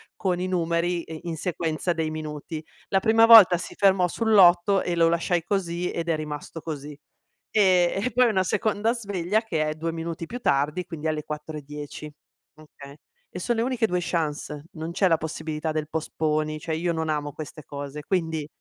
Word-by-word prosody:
con 180 -3 -1
i 185 - -2
numeri 170 -1 0
e 160 -1 -9
in 170 -2 -4
sequenza 165 0 -2
dei 160 -1 -2
minuti. 155 0 -6 0.3
La 195 - +3
prima 225 +2 +5
volta 220 -6 +9
si 170 - -7
fermò 190 -2 +4
sull'8 195 -2 +4
e 175 - -1
lo 165 0 +4
lasciai 170 +1 +1
così 180 -1 -2
ed 170 0 -3
è 165 - +2
rimasto 150 +1 -6
così. 150 -2 -6 0.5
Ehm, 190 -2 +3
e, 250 - -1
poi 250 0 +5
una 190 -4 +2
seconda 215 +4 0
sveglia 205 -3 -1
che 160 -9 -1
è 155 - -1
2 165 +2 -3
minuti 165 0 -5
più 245 - -6
tardi, 150 - 0
quindi 160 -2 -5
alle 155 -1 -1
4.10. 150 0 -7 0.4
Okay. 145 -2 -14 0.3
E - - -7
son 240 - 0
le 225 - +1
uniche 245 -3 +1
2 180 -2 0
chance, 150 -3 -3
non 160 +1 -5
c'è 190 +1 +3
la 165 - +4
possibilità 160 0 -4
del 155 -1 -3
postponi, 155 -1 -1
cioè 160 +1 -4
io 170 +1 -1
non 160 -1 -2
amo 145 -2 -2
queste 155 -1 -8
cose, 145 +1 -7
quindi 160 -4 -1
165 Hz, 185 wpm, -25 LUFS, 155-185 Hz, 0.5 s, volta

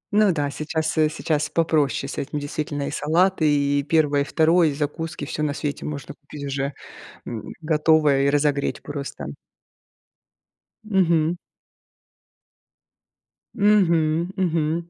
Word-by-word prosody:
Ну 210 -2 +5
да, 145 -3 -1
сейчас, 160 +2 -2
э, 155 -1 +4
сейчас 155 -1 -1
попроще 155 -4 +1
с - - -5
этим, 145 +2 -4
действительно. 145 0 -3
И - - -4
салаты, 165 +1 +2
и 145 0 +2
первое, 145 -1 +2
и - - +2
второе, 165 +3 +3
и 145 - 0
закуски- 155 +1 -4
всё 150 - -4
на 145 -1 0
свете 145 -1 -4
можно 145 -2 -6
купить 145 -1 -10
уже, 140 0 -2 0.5
м, 115 -3 -6
готовое 150 -3 +3
и - - +4
разогреть 145 -1 0
просто. 145 -1 -6 1.6
Мгм. 175 -5 +2 2.2
Мгм, 170 -5 +3
мгм. 170 -2 -1
155 Hz, 125 wpm, -23 LUFS, 145-165 Hz, 2.2 s, Ну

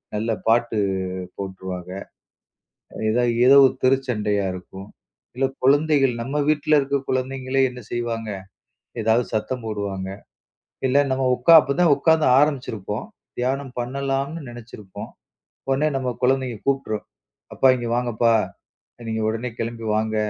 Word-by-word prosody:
நல்ல 110 +2 -1 0.2
பாட்டு 115 -1 +2 0.6
போட்டுருவாங்க. 95 -2 -6 1.2
ஏதாவது 120 +1 +2
ஏதோ 140 +2 +8
ஒரு - - 0
தெருச்சண்டையா 110 -6 +1
இருக்கும். 95 +2 -10 0.5
இல்ல 135 +1 +2 0.2
குழந்தைகள், 140 -2 +3
நம்ம 135 +5 -4
வீட்டுல 150 0 +3
இருக்கிற 140 0 -1
குழந்தைங்களே 130 +1 -1
என்ன 125 0 -10
செய்வாங்க? 115 -2 -3 0.7
ஏதாவது 115 +2 +2
சத்தம் 120 +3 -2
போடுவாங்க. 100 -3 -4 0.8
இல்ல 130 - +2
நம்ம 130 0 0
உக்கா 125 +7 +5
அப்பதான் 150 +2 +3
உக்காந்து 160 +2 +3
ஆரம்பிச்சிருப்போம். 125 - -1 0.3
தியானம் 135 +1 -1
பண்ணலாம்னு 135 +5 -2
நெனச்சிருப்போம். 115 -5 -10 0.6
உடனே 140 +3 +2
நம்ம 130 -1 -2
கொழந்தைங்க 130 -2 +1
கூப்டுரும். 135 -6 -1 0.5
"அப்பா 135 - +4
இங்க 120 -1 -4
வாங்கப்பா. 120 -1 +2 0.7
நீங்க 110 0 -2
உடனே 115 +3 -3
கிளம்பி 115 0 -4
வாங்க. 110 0 -1
125 Hz, 115 wpm, -22 LUFS, 110-135 Hz, 1.2 s, ஏதோ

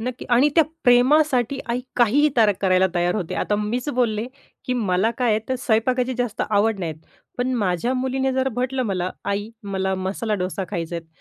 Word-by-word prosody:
नक्की. 250 +2 -5
आणि 250 +5 +5
त्या 325 - +6 0.2
प्रेमासाठी 260 +1 +4
आई 240 +2 0 0.2
काहीही 260 +6 +4
तयार 215 -3 +5
करायला 185 -1 +3
तयार 175 0 +1
होते. 185 -6 -3
आता 205 - 0
मीच 230 +6 -2
बोलले, 230 -3 0 0.4
की 255 - -1
मला 205 -2 +1
काय 245 -3 +2
आहे 215 - +3
तर 260 - 0
स्वयंपाकाची 250 +2 +1
जास्त 245 -3 -1
आवड 210 0 +2
नाहीत, 160 -3 -3 0.4
पण 255 +1 0
माझ्या 200 +2 0
मुलीने 265 +1 0
जर 260 0 +1
म्हटलं 255 +1 -1
मला 185 -2 -1
आई, 205 +2 -2 0.2
मला 190 0 0
मसाला 195 +4 -2
डोसा 185 0 -3
खायचं 170 -3 -4
आहेत. 165 -1 -8
225 Hz, 180 wpm, -22 LUFS, 190-255 Hz, 0.4 s, त्या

